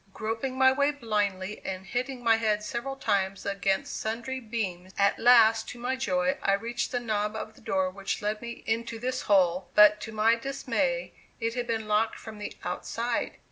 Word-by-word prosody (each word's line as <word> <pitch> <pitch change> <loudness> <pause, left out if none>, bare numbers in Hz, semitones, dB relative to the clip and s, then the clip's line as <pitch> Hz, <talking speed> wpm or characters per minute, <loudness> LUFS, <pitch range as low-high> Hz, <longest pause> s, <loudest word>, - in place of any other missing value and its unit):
Groping 225 +4 -3
my 260 0 +6
way 280 +2 +2
blindly 210 -7 -2
and 190 0 -5
hitting 250 +3 -3
my 225 -1 +5
head 215 -2 0
several 240 +5 -4
times 195 -6 -1
against 200 +6 -1
sundry 235 +4 -3
beams, 195 -6 -4
at 200 0 +3
last, 225 -2 +6
to - - -8
my 250 +2 -1
joy, 270 +1 0
I 195 - +2
reached 230 +4 -2
the 245 - 0
knob 210 -2 -1
of 220 0 -5
the - - -19
door 190 -3 0
which 195 +1 -3
led 210 +1 -2
me 235 0 -7
into 230 +1 -1
this 255 +2 -2
hole, 180 -2 +3
but 210 0 +7
to 225 - -6
my 220 +1 +3
dismay - - -1 0.3
it 230 -1 -1
had 245 -1 -3
been 225 -2 -2
locked 215 +1 +1
from 220 -2 -10
the 205 - -5
outside! 230 +6 -2
225 Hz, 185 wpm, -28 LUFS, 205-245 Hz, 0.3 s, but